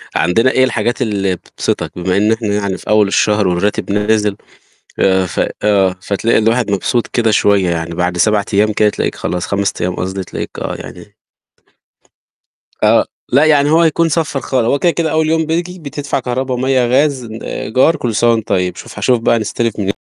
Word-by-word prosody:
عندنا 115 +9 +2
إيه 130 - +3
الحاجات 120 0 -1
اللي 100 -5 0
بتبسطك؟ - - -4
بما 90 +1 0
إن 105 +2 +2
إحنا 110 -1 -3
يعني 100 -2 -1
في - - -11
أول 105 -1 +4
الشهر 105 0 +2
والراتب 90 +3 -1
نازل، 105 0 +1 0.6
آآ، 95 -1 +2
ف 85 - -3 0.2
آه 95 -3 +2
فتلاقي 105 +4 +1
الواحد 115 +1 +1
مبسوط 100 +4 0
كده 115 -2 0
شوية 100 -3 +2
يعني، 85 0 -3
بعد 90 +1 -1
7 105 +2 +2
أيام 105 +2 +3
كده 105 0 +2
تلاقيك - - -2
خلاص، 90 -1 -3
5 100 0 0
أيام 90 0 -1
قصدي 95 +1 -4
تلاقيك - - -6
آه، - - -3
يعني - - -11 1.7
آه، - - +4 0.3
لأ 140 +5 +4
يعني 145 -2 +4
هو 160 +2 +4
هيكون 165 0 +2
صفَّر 155 -4 -1
خالص. 130 -3 -1
هو 140 - +1
كده 175 - +3
كده 165 -1 -1
أول 155 0 +1
يوم 160 0 +1
بييجي 175 +3 -3
بتدفع 145 -2 -4
كهربا، 130 +1 -2
مَيَّة، 130 0 +1
غاز، 135 +1 +1
آآ 110 -1 -6
إيجار 130 +8 +2
كل 120 -7 -3
سنة 120 +2 +3
وأنت 115 -2 -1
طيب. 90 -2 0
شوف - - -11
هاشوف 125 -2 +2
بقى 115 0 +2
نستلف 110 +1 -2
مني 100 0 -1
110 Hz, 190 wpm, -15 LUFS, 100-130 Hz, 1.7 s, أول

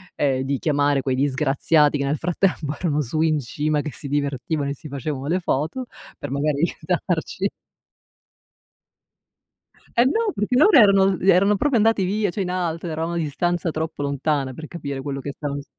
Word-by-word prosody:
ehm 135 -2 +1
di 135 0 -1
chiamare 145 -2 +1
quei 130 -1 -1
disgraziati 145 +2 +2
che 140 - -1
nel 145 +2 0
frattempo 165 -3 0
erano 150 -4 0
su 145 +4 -3
in 155 -2 +2
cima 150 +4 -1
che 150 - -5
si 140 - -8
divertivano 140 +1 -1
e - - -2
si 155 - -10
facevano 140 0 -4
le 180 +3 0
foto 160 - -1 0.3
per 145 - -6
magari 145 +1 0
aiutarci. - - -1 2.5
E 240 - +5
no, 435 - +1
perché 210 +4 -1
loro 395 +9 +6
erano 195 -2 +5
erano 195 +2 +4
proprio 270 +3 +1
andati 220 -2 +3
via, 205 0 0
cioè, 200 - -3
in 180 - -2
alto, 175 -2 -2
eravamo 165 +1 -3
a - - -2
distanza 170 +3 -1
troppo 160 -1 -4
lontana 140 -1 -1
per 155 +5 -8
capire 140 -5 -6
quello 140 0 -4
che 140 +1 -5
stavano 145 -1 -4
s - - -16
155 Hz, 175 wpm, -22 LUFS, 140-180 Hz, 2.5 s, loro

